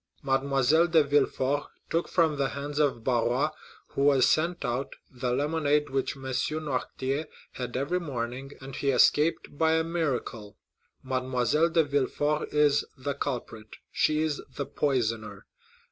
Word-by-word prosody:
Mademoiselle 140 +4 +3
de 160 -2 +5
Villefort 140 0 +1 0.2
took 165 +1 +1
from 165 -4 +2
the 140 -1 0
hands 145 +4 -4
of 135 -6 +1
Barrois, 125 +4 +1 0.4
who - - -3
was 140 -2 +5
sent 165 +6 +1
out, 125 +3 -2 0.2
the 125 -1 -3
lemonade 150 +1 +1
which 135 +1 -1
M. 135 - -12
Noirtier 135 +1 -2 0.2
had 125 -1 -5
every 155 +7 0
morning, 130 -3 -5
and 135 0 -9
he 140 - -3
has 130 -3 +6
escaped 150 0 +1
by 160 0 +4
a 160 0 +2
miracle. 135 -10 -3 0.5
Mademoiselle 130 +4 +1
de 165 0 +3
Villefort 145 +1 0
is 150 -1 +3
the 140 +2 -3
culprit—she 130 +3 -2
is 155 -2 -1
the 140 - -3
poisoner! 115 -9 -1
140 Hz, 140 wpm, -28 LUFS, 130-150 Hz, 0.5 s, has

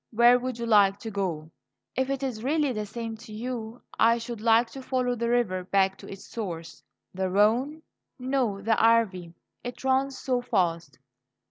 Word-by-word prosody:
Where 240 +2 +5
would 255 -1 -4
you 235 - -4
like 200 -3 +5
to 225 - -6
go?" 170 -6 -3 0.4
"If 260 0 0
it 275 0 -2
is 240 -5 -3
really 295 +1 +1
the 215 -2 -4
same 225 +1 -5
to 220 - -13
you, 230 +1 -6 0.2
I 230 +1 +5
should 230 -1 -6
like 230 +1 +4
to 270 - -8
follow 255 -1 0
the 235 0 -2
river 215 -7 +1
back 190 +1 +2
to - - -11
its 195 +1 -9
source." 170 -7 -6 0.3
"The 190 0 -1
Rhone?" 240 +11 +2 0.3
"No, 250 -6 -1
the 225 +1 +3
Arve; 195 -7 +2 0.3
it 245 +1 -7
runs 265 +1 +1
so 250 -2 -1
fast." 170 - -1
230 Hz, 175 wpm, -27 LUFS, 195-250 Hz, 0.4 s, Where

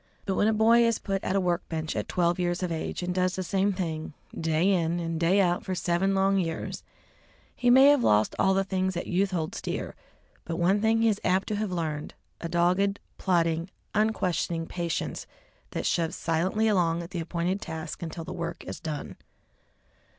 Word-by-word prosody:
But 195 - 0
when 205 - +2
a - - +4
boy 225 +2 +5
is 230 -1 +2
put 195 -1 -3
at 190 - -1
a - - +4
work 175 -1 -1
bench 160 -1 -3
at - - -2
twelve 175 0 +1
years 175 +1 0
of 180 - -1
age 165 +2 -3
and 180 0 -1
does 185 0 +1
the 185 - -2
same 195 +2 +1
thing 160 -5 -4 0.2
day 165 +4 +1
in 170 -2 +1
and 165 -1 -3
day 175 +4 +3
out 175 -2 +2
for 185 - -3
seven 180 +3 +1
long 195 0 +3
years, 165 -3 -3 0.7
he 245 - +1
may 260 +2 +8
have 290 -4 +4
lost 105 +1 +3
all - - +4
of 190 - +3
the 195 - +2
things 190 -1 -1
that 175 - -3
youth 195 +2 +1
holds 165 -4 -3
dear, - - -4 0.5
but 165 - -4
one 185 +4 +2
thing 225 +1 +3
he - - +5
is 210 -1 -1
apt 190 +1 +1
to 210 - 0
have 210 -2 -2
learned, 155 -4 -3 0.2
a 170 - -5
dogged, 180 +4 +2 0.2
plodding, 170 -2 +1 0.2
unquestioning 180 -6 0
patience 170 -1 -3 0.4
that - - -4
shoves 165 -1 0
silently 185 +7 0
along 170 -5 +2
at 170 - -10
the 175 - -3
appointed 175 +3 -2
task 160 0 -6
until 165 0 -5
the - - -6
work 170 0 -5
is - - -6
done. 155 -3 -5
180 Hz, 200 wpm, -27 LUFS, 165-195 Hz, 0.7 s, may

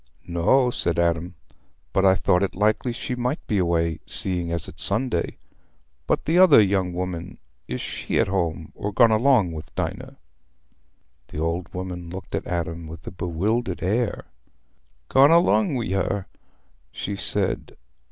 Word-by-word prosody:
"No," 105 +10 +2
said 85 - 0
Adam, 85 +1 0 0.6
"but 95 - +2
I 95 0 +6
thought 90 0 +2
it 100 - -1
likely 110 +5 +1
she 120 - -5
might 125 +4 -2
be 105 - 0
away, 85 -2 0
seeing 90 -3 +1
as 85 -2 -3
it's 80 - -7
Sunday. 110 -3 0 0.7
But - - 0
the 165 +3 +3
other 185 -9 +8
young 95 -3 +2
woman—is 85 -9 -6
she - - -3
at - - +3
home, 85 -4 -2
or 105 - -4
gone 115 +2 +5
along 110 -5 +3
with 80 -1 -9
Dinah?" - - -4 1.1
The - - -10
old 85 +3 -2
woman 90 -2 -5
looked 95 +2 -9
at - - -3
Adam 85 -1 -3
with 80 +1 -10
a - - -6
bewildered 90 +4 -2
air. 105 +4 -1 0.8
"Gone 135 - +6
along 170 0 +4
wi' 115 -7 -2
her?" 95 0 -1 0.7
she 100 - -4
said. - - +1
95 Hz, 150 wpm, -24 LUFS, 85-110 Hz, 1.1 s, other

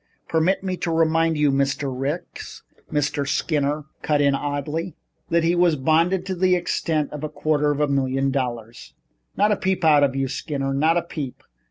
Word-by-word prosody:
"Permit 165 +4 +1
me 185 -1 -2
to 170 - -3
remind 165 0 +2
you, 150 -1 +3
Mr. 140 0 0
Ricks," 140 +6 -5 0.3
Mr. 145 -1 -1
Skinner 150 0 0 0.2
cut 150 -1 +1
in 140 -1 +3
coldly, 145 +4 -3 0.3
"that 170 0 +2
he 170 +1 +2
was 175 -2 +3
bonded 165 +6 +2
to 190 - -2
the 185 0 +2
extent 160 -3 -1
of 150 0 -6
a 155 - -2
quarter 150 -1 0
of 145 0 -1
a 150 - +2
million 135 -1 0
dollars." 120 -4 -4 0.4
"Not 210 +2 +3
a - - +3
peep 190 -3 -1
out 150 -2 +6
of 135 -1 +1
you, 135 0 0
Skinner. 135 0 -3
Not 160 +5 +2
a 175 - 0
peep. 145 -6 -7
150 Hz, 185 wpm, -23 LUFS, 140-165 Hz, 0.4 s, out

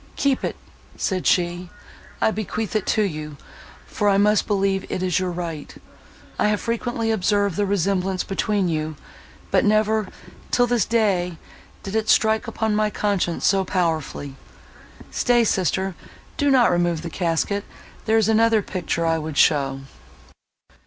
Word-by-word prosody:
"Keep 275 -2 +1
it," - - -2 0.4
said 185 -2 -1
she, 175 0 +1 0.5
"I - - +3
bequeath 215 0 -4
it 215 - 0
to 215 - +2
you, 155 -6 -4 0.5
for 205 - 0
I 195 - +3
must 210 +1 +3
believe 195 -2 +1
it 185 - -2
is 185 -1 +1
your 185 -1 -1
right. 170 -4 -6 0.6
I - - +3
have 210 -1 +1
frequently 230 -1 -2
observed 200 -2 +1
the 205 +1 0
resemblance 190 -1 0
between 200 0 0
you; 155 -1 -2 0.6
but - - +3
never, 215 0 +2 0.4
till 245 - +3
this 240 -3 +1
day, 195 -7 +1 0.5
did 195 +2 -5
it 220 0 0
strike 220 +2 +3
upon 220 -1 -1
my 215 0 +2
conscience 200 -5 -1
so 195 0 +3
powerfully! 160 -6 -2 0.8
Stay, 240 -1 +3
sister, 190 -2 0 0.4
do 285 - +1
not 255 -3 +5
remove 175 -2 0
the 170 - -5
casket—there 200 +6 -2
is 220 -2 +3
another 225 -1 +3
picture 170 -3 -2
I 165 0 +1
would 155 -2 -5
show." 135 -3 +3
195 Hz, 145 wpm, -22 LUFS, 175-220 Hz, 0.8 s, not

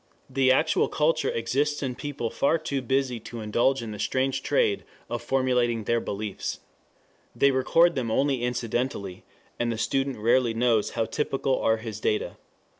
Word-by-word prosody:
The 130 0 +3
actual 155 +4 +3
culture 155 +1 +1
exists 145 +6 -1
in 130 -2 -2
people 125 -3 -4
far 150 +4 +2
too 140 -4 -3
busy 130 -1 0
to 115 +1 -8
indulge 120 +4 +1
in 110 - -6
the 105 - -7
strange 130 +4 0
trade 445 -5 +1 0.3
of 120 -1 -2
formulating 125 -2 +1
their 115 +2 +1
beliefs. 105 -2 -4 0.8
They 140 - +4
record 165 +6 +4
them 125 -6 -2
only 135 +2 +1
incidentally, 120 -5 -2 0.4
and 120 0 0
the 115 - -3
student 135 +3 -1
rarely 120 +1 +2
knows 115 -2 +2
how 115 - +2
typical 135 0 -1
are 110 0 +3
his 110 -2 -7
data. 105 - -1
125 Hz, 160 wpm, -26 LUFS, 115-135 Hz, 0.8 s, They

